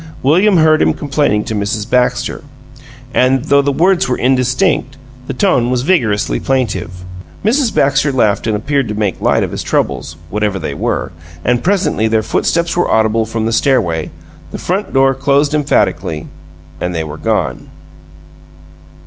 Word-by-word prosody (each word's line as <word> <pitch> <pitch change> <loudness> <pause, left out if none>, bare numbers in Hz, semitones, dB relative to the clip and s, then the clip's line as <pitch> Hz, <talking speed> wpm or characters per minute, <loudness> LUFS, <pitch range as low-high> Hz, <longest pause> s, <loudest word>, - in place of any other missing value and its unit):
William 180 +8 +4
heard 155 -1 +4
him - - +2
complaining 140 -7 0
to - - -5
Mrs. 105 0 -2
Baxter, 125 0 0 0.7
and 130 0 +2
though 140 -1 +4
the 140 0 0
words 180 +5 +2
were 125 - 0
indistinct, 130 +1 +1 0.3
the - - -3
tone 155 - +2
was 125 -1 0
vigorously 115 - +1
plaintive. 95 -9 -2 0.4
Mrs. 240 +1 +2
Baxter 140 +1 +2
laughed 110 -5 +1
and 110 - +1
appeared 140 +3 -1
to 105 - -4
make 105 -3 -2
light - - +2
of - - -3
his - - -4
troubles, 80 - -2 0.2
whatever 105 -1 -1
they 80 -5 -4
were - - -2 0.3
and 120 0 +2
presently 185 - +1
their 110 0 +1
footsteps 170 +8 0
were 175 - +1
audible 110 0 +2
from 115 0 -2
the 115 - -1
stairway; 105 - +1 0.4
the - - -6
front 190 +4 -2
door 135 0 +3
closed 140 +2 +1
emphatically, 95 - 0 0.5
and 90 0 -3
they 80 - -1
were 75 -1 -7
gone. - - -2
125 Hz, 155 wpm, -15 LUFS, 105-145 Hz, 0.7 s, William